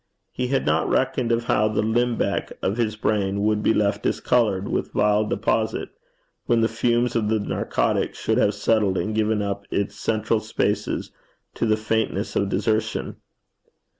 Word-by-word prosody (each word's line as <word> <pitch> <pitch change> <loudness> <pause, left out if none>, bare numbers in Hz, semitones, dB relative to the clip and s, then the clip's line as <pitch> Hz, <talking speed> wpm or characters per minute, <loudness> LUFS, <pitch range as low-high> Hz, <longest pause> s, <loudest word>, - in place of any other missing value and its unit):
He 125 - -2
had 135 +2 0
not - - +1
reckoned 120 -2 +1
of 115 0 +1
how 110 -2 +2
the 110 -1 0
limbeck 120 +2 0
of 100 +4 0
his 110 -3 0
brain 100 -2 0
would 105 0 +1
be - - +3
left 100 -1 +1
discoloured 105 -6 +1
with - - -2
vile 105 +1 +3
deposit, 110 +1 -1 0.6
when 120 -2 +3
the 115 - +3
fumes 120 +1 0
of 110 -2 +1
the 110 0 +2
narcotic 100 - -1
should - - 0
have 100 - +2
settled 105 -2 +1
and 110 - -1
given 110 -1 +1
up 100 0 -3
its 100 - -1
central 110 0 0
spaces - - -2 0.4
to 115 - -1
the 110 0 +3
faintness 110 -2 -1
of 100 - +1
desertion. 110 +3 -1
110 Hz, 165 wpm, -23 LUFS, 105-115 Hz, 0.6 s, be